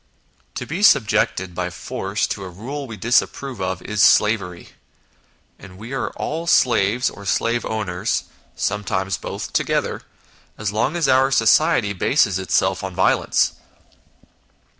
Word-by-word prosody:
To - - -4
be 165 +6 -4
subjected 95 - +3
by 90 0 -3
force 100 +2 -3
to 100 - -4
a 95 - -7
rule 135 +10 -7
we 110 -3 -8
disapprove 120 +2 0
of 95 -1 -3
is 105 -1 -1
slavery, 100 -6 +3 0.9
and 90 -2 -13
we 115 +6 -8
are 135 - -2
all 165 +3 -4
slaves 120 - +3
or 100 - -6
slave 115 +4 0
owners 105 -1 -2 0.3
(sometimes 95 -2 -2
both - - -6
together) - - -1 0.6
as 105 -1 -2
long 120 +9 0
as 165 -5 +1
our 130 0 +4
society 135 -6 +3
bases 100 -1 +2
itself 95 - 0
on - - -5
violence. - - +2
105 Hz, 135 wpm, -21 LUFS, 95-130 Hz, 0.9 s, our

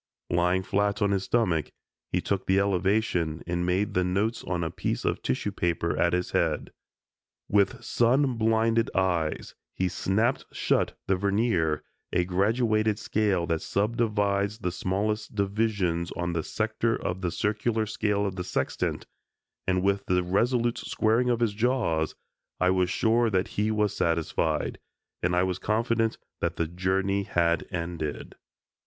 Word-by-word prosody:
Lying 90 +2 +2
flat 100 +1 0
on 100 - +2
his 95 -1 0
stomach, 90 -11 +1 0.4
he - - +1
took 100 -1 -2
the 95 - +3
elevation 95 -4 +1
and 85 0 -1
made 100 +3 +1
the 90 - +2
notes 100 +6 0
on 90 -2 -2
a 80 - -2
piece - - -2
of - - 0
tissue 65 - -1
paper 85 -1 -1
at 85 - +2
his 90 0 0
head. - - 0 0.8
With 100 -1 +2
sun 130 +3 +2
blinded 115 0 +2
eyes, 90 -5 0 0.2
he 95 - +1
snapped 105 +7 0
shut - - 0
the 95 - +2
vernier 100 -5 +1 0.3
(a 90 - +2
graduated 110 +3 +1
scale 100 -6 0
that 80 -2 -1
subdivides 105 -1 0
the 90 -5 -2
smallest 105 +5 -2
divisions 100 -4 0
on 85 0 -2
the 85 - 0
sector 110 +5 -1
of 90 +1 -3
the 90 - 0
circular 110 +4 0
scale 105 -2 0
of 95 -1 -3
the 90 - -2
sextant) - - -2 0.6
and 90 0 +2
with 100 0 +1
the 90 0 +2
resolute 120 +6 +1
squaring 115 +3 +1
of 120 -1 +1
his 115 -3 +2
jaws, 110 -9 0 0.4
I 90 0 +3
was 90 -1 +2
sure 115 +4 +2
that 95 -3 0
he 105 +1 0
was 105 -2 +1
satisfied, 85 -1 0 0.4
and 90 0 +1
I 90 - +3
was 90 -1 -1
confident 115 +1 +1 0.2
that - - -1
the 85 - 0
journey 95 +3 0
had 85 -4 +1
ended. 85 -4 -4
100 Hz, 150 wpm, -27 LUFS, 90-110 Hz, 0.8 s, the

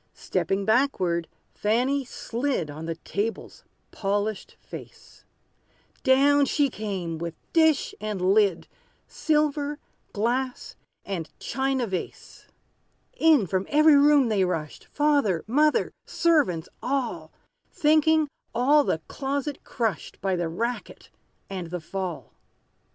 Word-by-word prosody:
Stepping 195 0 -1
backward, 190 -9 +1 0.3
Fanny 250 +6 +1
slid 240 - -3
On 155 +2 -7
the 165 - -2
table's 205 +6 -4 0.3
polished 205 +1 -2
face: - - -12 0.8
Down 280 +2 +5
she 280 -2 +1
came, 190 -7 -4
with 170 -1 -5 0.2
dish 320 -3 +3
and 210 -2 -3
lid, 200 -5 +2 0.4
Silver 295 -1 0 0.3
glass 245 +4 -2 0.3
and 180 -5 -4
china 265 0 -1
vase! 190 -4 -6 0.7
In, 320 - +4
from 185 +1 -2
every 305 +1 +6
room 285 -3 +5
they 205 -3 +2
rushed, 165 -5 -3
Father 285 - +1
mother 300 +7 +2 0.2
servants 295 - +2
all, 240 - -2 0.4
Thinking 310 0 +3 0.3
all 285 +5 +4
the 160 - -1
closet 280 +1 -3
crushed, 225 -8 -3
By 190 -1 0
the 175 -2 -2
racket 235 +9 -4 0.4
and 185 -3 -5
the 180 +1 -4
fall. 180 +1 -5
230 Hz, 110 wpm, -26 LUFS, 185-285 Hz, 0.8 s, every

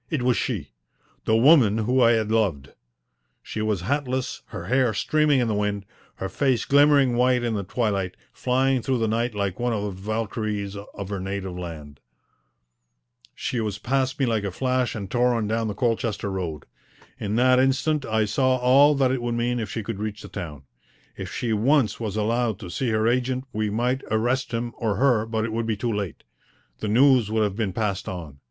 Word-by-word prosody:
It 155 -7 -1
was 125 -1 +3
she - - -3 0.5
the 110 - +3
woman 120 -5 +6
whom 125 +4 +1
I 120 -1 +6
had 110 -1 0
loved. 95 -12 0 0.7
She 110 - -5
was 105 -4 0
hatless, 130 +3 -2
her 100 -6 -7
hair 125 0 +2
streaming 150 +5 +2
in 120 - +1
the 110 - 0
wind, 105 -1 -1 0.3
her 95 - -4
face 130 +2 0
glimmering 140 -3 +4
white 125 0 +3
in 120 -2 0
the 100 -2 -2
twilight, 100 -3 -2 0.2
flying 130 0 +1
through 130 +2 0
the 115 -1 0
night 115 +1 -1
like 100 -3 -2
one 120 0 0
of 105 -2 -2
the 105 - -3
Valkyries 105 0 -3
of 100 -1 -8
her 100 -2 -3
native 95 -1 -4
land. 80 -5 -8 1.4
She 125 - -3
was 105 -2 -3
past 130 +4 -1
me 135 - +3
like 110 -3 0
a 100 - -1
flash 125 +5 -1
and 100 -3 -5
tore 125 0 +2
on 115 -2 -1
down 110 +1 0
the 105 - -4
Colchester 115 -3 -1
Road. 85 -6 -4 0.5
In 105 +1 -2
that 125 +1 +4
instant 135 +3 +1
I 110 -2 +1
saw 130 +5 +2
all 135 +4 +5
that 135 -2 +2
it 130 -2 -1
would 120 0 -2
mean 120 +1 0
if 110 -4 -4
she 115 - -4
could 100 - -5
reach 105 0 -4
the - - -9
town. 80 -8 -7 0.5
If - - -7
she 115 -2 -2
once 125 +3 +2
was 110 -3 -3
allowed 110 0 0
to 90 -4 -7
see 125 +6 -1
her 110 0 +1
agent 130 +2 0
we 110 0 -1
might 125 +5 0
arrest 120 +4 0
him 120 0 -3
or 110 -4 0
her, 115 -1 +2
but 110 -1 -1
it 115 - -4
would 115 0 -2
be 110 -2 -1
too 115 +1 -1
late. 100 -5 -4 0.6
The - - -3
news 125 0 +4
would 110 0 +1
have 100 -2 -1
been 105 -3 -1
passed 100 -1 -2
on. 80 -7 -7
115 Hz, 200 wpm, -24 LUFS, 105-125 Hz, 1.4 s, woman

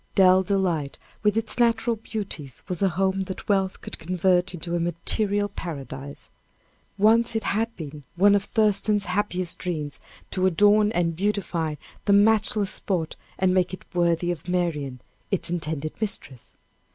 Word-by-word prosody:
Dell 185 -1 +6
Delight, 180 -7 0 0.2
with 210 0 +2
its 225 +1 -1
natural 235 0 +3
beauties, 200 - -6
was 180 0 -2
a 195 - +4
home 190 +2 0
that 190 - -7
wealth 195 -2 +1
could - - -8
convert 180 +1 +2
into 175 -1 -4
a - - 0
material 200 +5 0
paradise. 140 -7 -7 0.7
Once 225 +3 +4
it 220 - 0
had 225 +3 -1
been 150 -2 -8
one 200 +3 +5
of 200 0 +2
Thurston's 210 -1 +2
happiest 185 -2 -1
dreams 155 -5 -3 0.3
to 185 0 +2
adorn 205 +4 +4
and 165 -2 +1
beautify 180 -5 -1 0.3
the 200 - +4
matchless 210 -1 +3
spot, 170 -5 -2 0.2
and 185 -1 +2
make 185 0 +1
it - - -21
worthy 175 0 +2
of 175 -1 -6
Marian, 150 -8 -1 0.3
its 185 -3 -1
intended 155 -3 -2
mistress. 170 - -4
185 Hz, 150 wpm, -25 LUFS, 170-205 Hz, 0.7 s, Dell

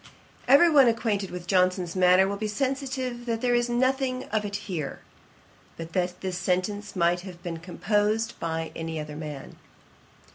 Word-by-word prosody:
Every 280 +7 +7
one 280 -4 +7
acquainted 220 -4 0
with 180 -1 -7
Johnson's 185 -1 +1
manner 185 +1 +5
will 200 - -2
be 215 +2 -3
sensible 260 +2 -2
that 230 -1 -1
there 245 -1 +2
is 240 0 +2
nothing 255 +1 +1
of 215 -1 0
it 200 -1 -4
here; 160 -8 -4 0.8
but 165 0 -8
that 180 -1 -1
this 185 -1 -3
sentence 195 +3 -1
might 175 0 +2
have 175 -1 -10
been 170 -2 -4
composed 210 +5 0
by 165 -1 -3
any 165 -1 -4
other 150 -1 -6
man. 150 -3 -7
195 Hz, 160 wpm, -26 LUFS, 175-235 Hz, 0.8 s, Every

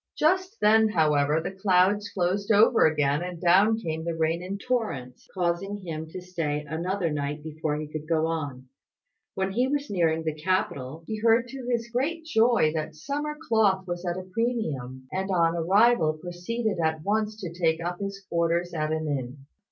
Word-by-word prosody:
Just 370 +6 +1
then, 220 +1 +5
however, 150 -4 +2
the 160 - -4
clouds 195 +1 +2
closed 195 +3 -1
over 220 -1 +6
again, 150 -1 +1
and 180 -1 -5
down 195 +6 +4
came 160 -7 -4
the 170 0 -2
rain 165 +1 0
in 190 +2 -4
torrents, 200 - -3
causing 185 +3 -1
him 160 -5 -6
to 160 - -7
stay 165 -5 -3
another 170 +3 -1
night 145 0 -3
before 155 -1 -3
he 155 +1 -4
could 155 0 -7
go 160 -1 +2
on. 145 -6 -4 0.7
When 190 0 -1
he 245 +6 +1
was 285 -1 -2
nearing 165 -4 +1
the 160 -1 -1
capital, 155 -3 -2
he 215 +3 -4
heard 230 +2 +3
to 265 -2 -7
his 235 -1 0
great 320 +7 -1
joy 230 - +3
that 155 -1 -3
summer 290 - -4
cloth 200 -5 +3
was 175 -1 -4
at 175 0 -2
a 185 - -5
premium; 160 - -3
and 190 +1 -2
on 170 -3 +2
arrival 185 0 +4
proceeded 180 +6 -3
at 160 -1 0
once 215 +2 -1
to 175 -5 -6
take 165 -2 +1
up 175 +1 -4
his 195 -1 -5
quarters 170 +1 0
at 155 -1 -1
an 160 0 -1
inn. 135 -2 -3
175 Hz, 180 wpm, -26 LUFS, 160-210 Hz, 0.7 s, over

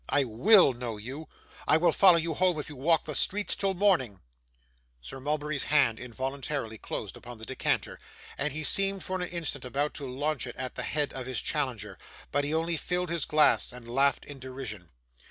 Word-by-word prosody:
I 145 - +3
WILL 135 - +5
know 120 -2 -5
you; 135 +9 -8 0.4
I - - +5
will 175 +2 +3
follow 185 -3 +6
you 165 0 -1
home 180 +1 +2
if 150 - -5
you 150 - -9
walk 160 +5 +1
the 150 - -4
streets 205 +8 +4
till 195 -1 -1
morning.' 170 - +2 0.8
Sir 65 - -9
Mulberry's 150 +1 -2
hand 135 -7 +3
involuntarily 130 -1 -4
closed 100 -4 -5
upon 120 -1 -10
the 110 - -7
decanter, 130 - -1 0.4
and 140 +1 -1
he 155 +3 -2
seemed 195 +4 +3
for 185 0 -3
an 180 - -2
instant 165 -5 -2
about 140 +4 -2
to 140 - -6
launch 135 0 -2
it 125 - -8
at 130 -1 -5
the - - -5
head 150 -1 -1
of 130 -1 -6
his 130 -5 -2
challenger. - - -3 0.3
But 145 0 +1
he 145 - -2
only 165 +1 0
filled 180 +2 -1
his 170 -3 0
glass, 150 -3 +3
and 125 -1 -11
laughed 135 +3 +1
in 145 -2 -10
derision. 130 -9 -7
145 Hz, 195 wpm, -28 LUFS, 125-165 Hz, 0.8 s, follow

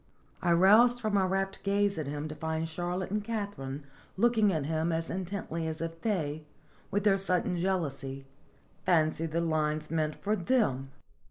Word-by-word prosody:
" - - -35
I 175 - +2
roused 215 +8 +6
from 215 -3 -2
my 195 -2 +4
rapt 195 +1 -1
gaze 200 -1 +1
at 150 - -3
him 145 +1 -3
to 155 - -6
find 160 +1 -2
Charlotte 175 +3 -3
and 210 0 -1
Katharine 200 -11 -4 0.3
looking 220 -1 +4
at 155 -5 -1
him 160 +2 0
as 165 0 -2
in 185 0 -2
tently 170 -4 -3
as 160 0 -4
if 165 0 -5
they, 155 -8 -1 0.5
with 205 0 0
their 195 -2 +4
sudden 180 -2 +1
jealousy, 145 -7 -2 0.6
fancied 160 -2 +2
the 170 +2 0
lines 155 -2 0
meant 155 -2 0
for 210 +1 -1
them. 170 - +1
170 Hz, 175 wpm, -30 LUFS, 155-200 Hz, 0.6 s, roused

